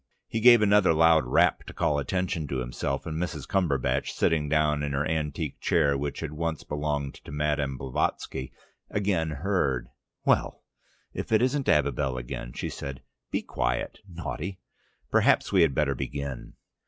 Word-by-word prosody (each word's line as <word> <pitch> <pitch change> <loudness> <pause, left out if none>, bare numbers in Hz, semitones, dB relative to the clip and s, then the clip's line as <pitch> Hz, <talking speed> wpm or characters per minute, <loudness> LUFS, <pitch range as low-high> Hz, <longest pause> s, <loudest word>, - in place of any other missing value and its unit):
He 115 - -2
gave 120 -1 +7
another 100 -5 +5
loud 80 -2 +5
rap - - +3
to - - -8
call 75 -1 +1
attention 90 0 -2
to 70 - -2
himself, 65 +2 -3
and 80 0 -3
Mrs. 90 -3 -4
Cumberbatch, 70 -8 0
sitting 75 -3 +1
down 75 -1 +2
in 70 -1 -2
her 70 +2 0
antique 80 -2 -2
chair 70 0 +2
which 70 +1 -3
had 80 -2 -4
once 80 0 -3
belonged 75 -2 -2
to - - -10
Madame 75 -2 -1
Blavatsky, 65 0 -2 0.4
again 95 -6 0
heard. 75 -5 -1 0.4
"Well, - - +1 0.5
if - - -4
that 110 +1 +3
isn't 135 +2 +1
Abibel 70 -3 +2
again," - - -5
she - - -4
said. 70 -1 -7 0.3
"Be - - -1
quiet, - - -2
naughty. 85 +2 -5 0.5
Perhaps - - +3
we - - +5
had 75 -5 +3
better 75 -3 +2
begin." 70 -2 -5
75 Hz, 155 wpm, -27 LUFS, 70-85 Hz, 0.5 s, gave